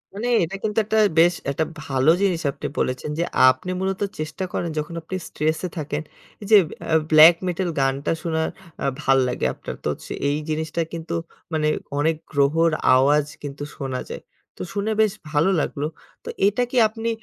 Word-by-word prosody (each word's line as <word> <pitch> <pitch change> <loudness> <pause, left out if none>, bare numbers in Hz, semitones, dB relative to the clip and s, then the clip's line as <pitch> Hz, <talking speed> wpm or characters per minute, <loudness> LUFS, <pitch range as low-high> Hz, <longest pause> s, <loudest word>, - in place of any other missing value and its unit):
মানে 230 +4 -3 0.2
এটা 180 +4 -4
কিন্তু 215 0 -2
একটা 220 +1 0 0.2
বেশ 175 +1 +6 0.2
একটা 155 +3 0 0.2
ভালো 135 +2 +2
জিনিস 180 -4 +1
আপনি 145 - -6
বলেছেন। 130 +3 -1
যে - - +2 0.3
আপনি 130 +8 -1
মূলত 190 +1 -2 0.2
চেষ্টা 155 +4 -4
করেন 170 - -2
যখন 160 +3 -5
আপনি 185 +4 -6
স্ট্রেসে 155 +4 -1
থাকেন, 150 0 -3 0.4
এই 200 - -7
যে 210 - +10 0.2
অ্যা 160 0 +2
ব্লাক 160 +2 +9
মেটাল 180 0 -1
গানটা 135 +2 0
শোনার 160 -1 -1 0.3
আ - - 0 0.2
ভাল্লাগে 130 -3 +2
আপনার। - - -7
তো - - -2
হচ্ছে - - -12 0.2
এই 145 - 0
জিনিসটা 160 +2 -2
কিন্তু 165 0 -5 0.4
মানে 155 -1 +1 0.3
অনেক 160 +2 +2 0.2
গ্রহর 155 +4 +3 0.2
আওয়াজ 145 +3 +4 0.2
কিন্তু 145 0 -6
শোনা 130 -2 -4
যায়। - - -6 0.4
তো - - -8
শুনে 205 +2 -1
বেশ 215 -2 +3 0.2
ভালো 150 +5 +3
লাগলো। 145 +1 -2 0.4
তো - - -7 0.2
এটা 215 +5 +1
কি 255 - -1
আপনি 225 +1 -4
160 Hz, 175 wpm, -23 LUFS, 145-185 Hz, 0.4 s, যে